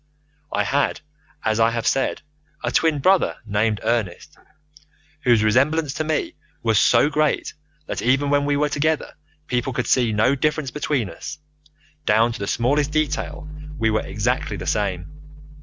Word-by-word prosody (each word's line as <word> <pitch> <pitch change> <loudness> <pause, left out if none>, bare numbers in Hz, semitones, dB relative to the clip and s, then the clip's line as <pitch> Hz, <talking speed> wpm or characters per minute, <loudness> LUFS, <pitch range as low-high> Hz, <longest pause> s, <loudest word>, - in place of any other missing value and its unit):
"I 105 - +1
had, 140 +7 0 0.4
as 110 0 +1
I 115 0 +5
have 115 -1 -3
said, 135 - 0 0.4
a - - -1
twin 160 -2 +2
brother 185 +7 +2
named 105 +1 0
Ernest, 115 - -2 0.9
whose 120 -3 +4
resemblance 135 +7 +2
to 155 - -2
me 155 -1 -1 0.3
was 110 -3 +3
so 120 +4 +4
great 155 0 0 0.3
that - - -4
even 135 +4 +2
when 145 0 +3
we 145 0 +1
were 150 +1 +2
together 155 +2 -1 0.3
people 125 -1 -1
could 125 0 -1
see 120 -4 +2
no 110 +5 +3
difference 145 -1 -1
between 145 -6 -1
us. 150 - -8 0.7
Down 110 +3 +4
to 115 - -7
the 100 - -3
smallest 140 +5 +1
detail 155 0 -2 0.3
we 110 -3 +1
were 110 - +1
exactly - - -2
the - - -6
same. 95 -5 -1
130 Hz, 155 wpm, -22 LUFS, 110-150 Hz, 0.9 s, I